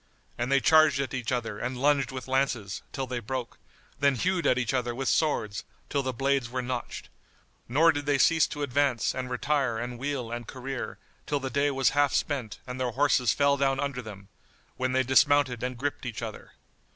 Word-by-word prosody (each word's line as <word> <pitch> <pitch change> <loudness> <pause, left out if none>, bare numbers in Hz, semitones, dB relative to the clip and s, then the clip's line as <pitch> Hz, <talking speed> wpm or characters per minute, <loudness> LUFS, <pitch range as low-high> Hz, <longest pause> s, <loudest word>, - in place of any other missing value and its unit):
And 120 +2 -2
they 140 - +5
charged 155 -1 +5
at 135 -2 -2
each 125 -2 -3
other 115 -4 -2
and 125 0 -3
lunged 140 0 +2
with 130 0 -7
lances, 130 -7 -1
till 135 - -3
they 125 -1 -3
broke, 120 +2 -5 0.4
then 140 -1 +3
hewed 180 +6 0
at 125 - +3
each 125 0 -1
other 120 -2 -1
with 135 +1 -3
swords, 110 - 0 0.3
till 140 - 0
the 130 -1 -2
blades 135 0 0
were 125 +1 -3
notched; 125 -1 -5 0.6
nor 160 +7 +5
did 145 -2 -4
they 145 -1 +3
cease 160 +3 +4
to 145 - -5
advance 140 -3 +1
and 130 -1 -4
retire 130 -1 0
and 120 +1 -5
wheel 130 -4 -3
and 120 -1 -5
career, 130 0 -5 0.3
till 145 -1 0
the 135 -1 -4
day 140 +1 +2
was 135 -2 +2
half 145 -1 +2
spent 130 -7 -2
and 125 0 -6
their 125 - +1
horses 130 -2 +2
fell 140 +2 +3
down 135 -1 +1
under 140 -3 -2
them, 100 -4 -10 0.5
when 130 0 -1
they 130 0 +3
dismounted 135 -1 +3
and 125 0 -3
gripped 140 0 -3
each 120 -1 -5
other. 110 -2 -8
130 Hz, 200 wpm, -28 LUFS, 120-140 Hz, 0.6 s, they